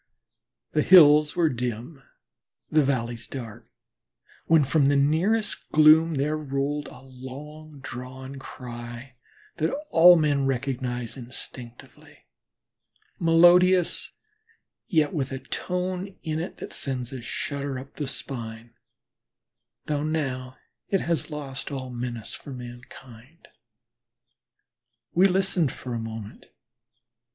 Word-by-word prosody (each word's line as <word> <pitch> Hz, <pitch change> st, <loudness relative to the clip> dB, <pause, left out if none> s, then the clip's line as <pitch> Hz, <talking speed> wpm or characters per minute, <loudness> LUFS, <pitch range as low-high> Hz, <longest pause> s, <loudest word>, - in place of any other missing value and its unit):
The 150 Hz, -, +2 dB
hills 150 Hz, -4 st, +7 dB
were 170 Hz, -2 st, +3 dB
dim, 125 Hz, +2 st, -4 dB, 0.7 s
the 155 Hz, -, +5 dB
valleys 120 Hz, -4 st, -2 dB
dark, 115 Hz, -6 st, -8 dB, 0.8 s
when 160 Hz, -2 st, +5 dB
from 140 Hz, +1 st, +3 dB
the 145 Hz, -, +3 dB
nearest 170 Hz, +10 st, +1 dB
gloom 155 Hz, +1 st, +6 dB
there 145 Hz, +3 st, 0 dB
rolled 145 Hz, 0 st, -2 dB
a 125 Hz, -, -12 dB
long 140 Hz, +3 st, -11 dB
drawn 130 Hz, +1 st, -8 dB
cry 120 Hz, 0 st, -9 dB, 0.4 s
that 160 Hz, 0 st, +1 dB, 0.2 s
all 175 Hz, +2 st, +8 dB
men 145 Hz, -4 st, +2 dB
recognize 125 Hz, -2 st, -2 dB
instinctively 125 Hz, -1 st, -10 dB, 0.9 s
melodious, 175 Hz, +2 st, +5 dB, 0.8 s
yet 160 Hz, -7 st, +2 dB
with 140 Hz, -5 st, -2 dB
a 135 Hz, -, -3 dB
tone 180 Hz, +6 st, -4 dB
in 160 Hz, -1 st, -2 dB
it 175 Hz, -, -5 dB
that -, -, -8 dB
sends 130 Hz, -2 st, -4 dB
a 130 Hz, -, -6 dB
shudder 140 Hz, +3 st, -4 dB
up 135 Hz, +2 st, -11 dB
the 145 Hz, -, -3 dB
spine, 115 Hz, -4 st, -7 dB, 1.1 s
though 150 Hz, -1 st, -1 dB
now 130 Hz, -5 st, -3 dB, 0.3 s
it 195 Hz, -, +1 dB
has 170 Hz, -5 st, -1 dB
lost 140 Hz, -3 st, -5 dB
all 130 Hz, -2 st, -5 dB
menace 120 Hz, -2 st, -5 dB
for 140 Hz, -, -9 dB
mankind. 125 Hz, +3 st, -12 dB, 1.6 s
We 185 Hz, +3 st, +6 dB
listened 185 Hz, -5 st, +1 dB
for 125 Hz, -, -7 dB
a 115 Hz, -, -2 dB
moment. 110 Hz, -1 st, -8 dB
140 Hz, 110 wpm, -26 LUFS, 125-155 Hz, 1.6 s, all